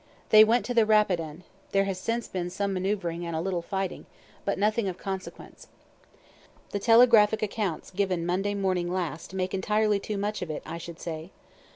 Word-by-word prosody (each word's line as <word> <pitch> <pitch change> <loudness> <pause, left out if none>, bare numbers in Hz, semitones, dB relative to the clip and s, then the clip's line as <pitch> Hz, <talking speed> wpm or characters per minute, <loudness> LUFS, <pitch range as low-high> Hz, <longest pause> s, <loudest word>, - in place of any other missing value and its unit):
They 215 0 +9
went 230 +3 +2
to 245 - -2
the 230 -2 +5
Rapidan; 180 -7 +1 0.3
there 195 0 +4
has 195 -2 -3
since 230 +4 -2
been 180 -2 -3
some 195 +2 -2
manoeuvering 185 -3 -2
and 170 -1 -4
a - - -1
little 180 0 -1
fighting, 190 +1 -4 0.4
but 200 - 0
nothing 210 +2 +1
of 185 -2 -4
consequence. 190 -1 -7 1.0
The 200 - -2
telegraphic 225 -1 +5
accounts 205 -5 -3
given 185 -3 -1
Monday 195 +4 0
morning 185 -3 0
last, 175 -1 -4
make 185 0 -2
entirely 210 +2 +1
too 210 +1 -4
much 205 +2 -2
of 180 - -4
it, 155 - -4
I 165 +1 -6
should 170 0 -9
say. 160 0 -6
195 Hz, 180 wpm, -27 LUFS, 175-210 Hz, 1.0 s, They